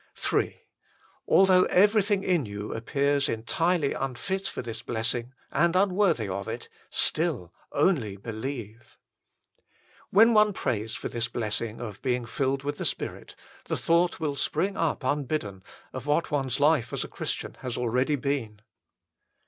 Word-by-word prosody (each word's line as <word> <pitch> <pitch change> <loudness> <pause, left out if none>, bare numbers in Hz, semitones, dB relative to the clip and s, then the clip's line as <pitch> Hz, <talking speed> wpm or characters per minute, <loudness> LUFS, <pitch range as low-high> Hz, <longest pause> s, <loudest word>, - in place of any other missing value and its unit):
Ill - - +5 0.8
Although 185 -1 +6
everything 205 0 +3
in 175 -5 +2
you 100 +1 -5
appears 140 +4 +1
entirely 150 +7 +1
unfit 190 +9 -3
for - - -4
this 115 -2 -7
Messing 120 +1 -2 0.2
and 170 +4 +2
unworthy 185 - +3
of 100 +1 -4
it, - - -6 0.2
still: 150 - +1
" - - -31
only 140 - +1
believe." 115 +1 -7 1.1
When 225 +4 +6
one 210 -1 +5
prays 110 - -2
for - - -4
this 115 0 -2
blessing 115 -1 -3
of 110 -4 -7
being 125 -2 0
filled 135 +3 -1
with 145 +1 -3
the - - -2
Spirit, - - -4 0.3
the - - -2
thought 170 +1 +2
will 150 -3 -1
spring 195 +7 -1
up 160 -3 -1
unbidden, 130 -8 -1 0.3
of 130 +2 -6
what 150 +3 +1
one 140 -2 0
s 130 +2 -1
life 145 -5 +3
as - - -2
a - - -6
Christian - - -4
has 125 -1 -4
already 125 +4 +1
been. 125 -7 -3
135 Hz, 150 wpm, -27 LUFS, 115-170 Hz, 1.1 s, Although